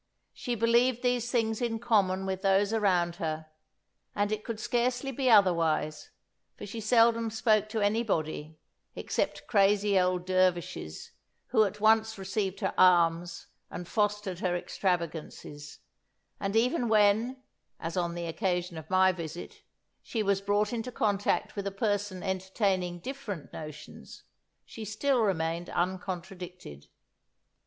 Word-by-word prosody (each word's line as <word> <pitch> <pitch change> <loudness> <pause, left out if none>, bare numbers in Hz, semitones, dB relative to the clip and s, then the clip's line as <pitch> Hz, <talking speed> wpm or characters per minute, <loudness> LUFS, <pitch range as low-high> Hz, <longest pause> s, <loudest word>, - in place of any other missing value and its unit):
She 245 -2 -3
believed 235 +2 +2
these 245 -1 +1
things 225 -2 0
in 235 -2 -1
common 200 -5 +1
with 190 -1 -3
those 195 +2 +2
around 180 -5 +1
her; 155 -1 -3 0.7
and 205 0 0
it 215 0 -2
could 230 -2 -5
scarcely 250 +4 0
be 265 0 0
otherwise, 165 -7 +3 0.5
for - - -7
she 205 +3 -6
seldom 230 +1 +3
spoke 215 -2 +2
to 220 -1 -2
anybody, 165 -8 -1 0.4
except - - -2
crazy 200 -1 +3
old 180 -1 0
dervishes, 180 - -1 0.4
who 220 -3 +4
at 205 +1 -5
once 220 0 +3
received 195 0 -3
her 190 - -1
alms 175 -1 +3 0.2
and 175 - -7
fostered 210 -4 -1
her 180 -2 0
extravagances; 165 -5 -4 0.6
and 195 +1 -2
even 245 +2 +2
when 220 +5 +3 0.4
(as 165 0 -5
on 175 -2 -1
the 170 0 -4
occasion 175 -1 -2
of 160 - -13
my 185 0 +5
visit) 170 -1 -8 0.4
she 225 -3 -2
was 200 -1 +1
brought 205 +2 +1
into 235 +1 -3
contact 205 -3 0
with 200 -1 -3
a - - -2
person 205 -2 -2
entertaining 190 -1 -1
different 220 - -7
notions, 155 -1 -10 0.4
she 225 - -9
still 245 +6 0
remained 170 -4 -1
uncontradicted. 180 - -5
195 Hz, 130 wpm, -29 LUFS, 175-220 Hz, 0.7 s, my